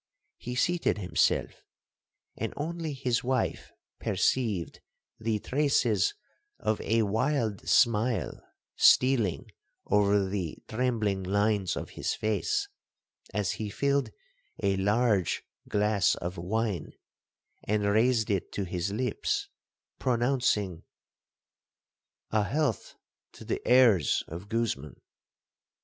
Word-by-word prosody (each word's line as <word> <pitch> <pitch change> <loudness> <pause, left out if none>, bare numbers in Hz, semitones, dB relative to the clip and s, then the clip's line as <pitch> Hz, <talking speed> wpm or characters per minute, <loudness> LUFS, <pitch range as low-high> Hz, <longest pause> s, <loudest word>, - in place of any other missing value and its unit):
He 125 +1 -5
seated 175 -1 +1
himself, 95 -3 0 0.7
and - - -4
only 160 0 -3
his 125 -3 -1
wife 130 -1 -1 0.3
perceived 110 -10 0 0.4
the 110 -1 0
traces 140 - +1 0.4
of 110 - -1
a 115 +1 +2
wild 110 0 -1
smile 115 -4 +2 0.3
stealing 125 -8 +4 0.3
over 100 -1 +3
the 95 -5 -3
trembling 110 -5 0
lines 100 -1 +1
of - - -6
his - - -2
face, 110 -3 -1 0.6
as 100 -3 0
he 110 -1 -4
filled 140 +5 0 0.5
a 100 -1 +2
large 100 -1 +1 0.3
glass 105 -2 +2
of 90 +2 -5
wine, 95 -1 -2 0.7
and 105 0 0
raised 110 +2 +2
it 95 -3 -1
to 100 - -2
his 90 +1 -3
lips, 125 +2 -1 0.5
pronouncing—'A 120 -8 +1 1.6
health 145 +8 -1 0.4
to - - -12
the - - -2
heirs 120 - +5
of 90 +5 -8
Guzman.' 115 - -2
110 Hz, 100 wpm, -29 LUFS, 100-125 Hz, 1.6 s, heirs